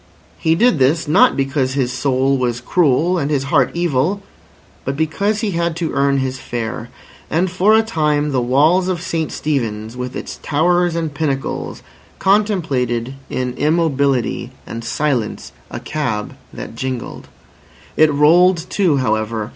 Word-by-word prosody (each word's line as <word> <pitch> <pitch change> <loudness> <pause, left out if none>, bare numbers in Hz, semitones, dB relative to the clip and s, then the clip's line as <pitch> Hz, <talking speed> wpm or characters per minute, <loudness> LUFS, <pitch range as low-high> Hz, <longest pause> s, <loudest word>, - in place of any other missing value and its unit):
He 160 0 +2
did 220 - +3
this, 150 +5 +2
not 150 - +4
because 135 -1 0
his 125 -3 0
soul 135 +1 +1
was 120 -2 -1
cruel 170 +5 +2
and 145 -2 -1
his 140 -3 0
heart 130 -4 +4
evil, 175 +4 0 0.6
but 135 +1 -3
because 200 +7 0
he 215 - -1
had 170 -1 -1
to 165 -1 -2
earn 140 0 +2
his 130 -1 -2
fare. 115 -3 -5 0.4
And 175 +3 0
for 190 +4 +4
a 220 - +4
time 150 -8 0
the 130 -2 +1
walls 150 +9 +3
of 185 -2 -1
St 165 -2 -3
Stephen's, 115 -6 -3
with 125 0 -5
its - - -6
towers 175 +3 +1
and 160 -3 -2
pinnacles, 135 -2 -3 0.3
contemplated 145 - 0 0.2
in 125 -1 -2
immobility 140 -6 +1 0.2
and 115 0 -7
silence 125 -3 -2 0.2
a - - -6
cab 125 -9 -3 0.2
that - - -8
jingled. 130 - -5 0.7
It 155 -1 +5
rolled 165 +4 +4
too, 180 -8 +2
however. 110 -2 -1
145 Hz, 145 wpm, -18 LUFS, 130-170 Hz, 0.7 s, It